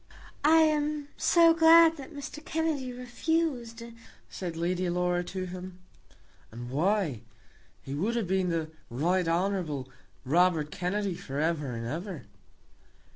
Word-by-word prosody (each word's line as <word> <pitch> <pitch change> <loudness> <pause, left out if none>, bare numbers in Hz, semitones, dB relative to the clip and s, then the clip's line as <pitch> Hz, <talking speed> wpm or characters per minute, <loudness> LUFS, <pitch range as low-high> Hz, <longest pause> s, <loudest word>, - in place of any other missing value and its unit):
"I 320 +2 +6
am 300 -1 +1
so 335 -1 +5
glad 330 0 +7
that 275 +2 -9
Mr. 300 +1 -8
Kennedy 310 -6 -2
refused," 250 -1 -2 0.5
said 175 -3 -5
Lady 180 +2 -1
Laura 180 0 0
to 185 +1 -4
him. 185 0 -8 0.7
"And 120 +2 -8
why? 165 - 0 0.6
He 135 - -6
would 200 +11 -1
have 230 -3 0
been 190 0 +1
the 160 -2 -2 0.2
Right 170 +9 0
Hon. 170 -5 -1 0.4
Robert 160 +1 +2
Kennedy 190 +2 -2
for 140 -4 -6
ever 150 -4 -1
and 115 0 -5
ever." 160 - -5
185 Hz, 130 wpm, -29 LUFS, 165-275 Hz, 0.7 s, glad